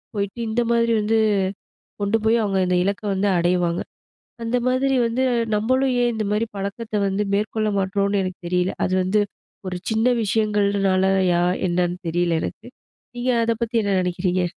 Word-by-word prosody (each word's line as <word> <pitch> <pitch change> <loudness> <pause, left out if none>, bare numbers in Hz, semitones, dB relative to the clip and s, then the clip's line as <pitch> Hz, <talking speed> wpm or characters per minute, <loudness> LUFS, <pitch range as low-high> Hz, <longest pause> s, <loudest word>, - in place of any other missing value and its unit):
போயிட்டு 200 +3 -3
இந்த 240 +2 +1
மாதிரி 230 0 +2
வந்து 220 +2 +1 0.8
கொண்டு 205 +2 +2
போய் 225 +1 +3
அவங்க 195 -2 0
இந்த 180 - +1
இலக்க 200 +3 -2
வந்து 195 +2 0
அடைவாங்க. 175 0 +1 0.6
அந்த 230 +2 0
மாதிரி 265 +1 +2
வந்து 245 +3 -1 0.3
நம்மளும் 255 +5 +1
ஏன் 240 - +2
இந்த 220 -1 -2
மாதிரி 215 +2 +1
பழக்கத்த 200 +3 -5
வந்து 195 +2 0
மேற்கொள்ள 215 +1 0
மாட்றோம்னு 200 +1 0
எனக்கு 185 -1 -5
தெரியல. 180 +1 +1
அது 185 - -1
வந்து 205 +3 +2 0.5
ஒரு 180 - -3
சின்ன 220 +2 +2 0.2
விஷயங்கள்னாலயா, 195 -4 +2 0.2
என்னன்னு 175 0 0
தெரியல 170 -1 +1
எனக்கு. - - -6 0.5
நீங்க 250 +1 -1 0.2
அதை 230 - +1
பத்தி 235 +1 -5
என்ன 200 - 0
நினைக்கறீங்க? 180 0 0
200 Hz, 150 wpm, -22 LUFS, 185-225 Hz, 0.8 s, போய்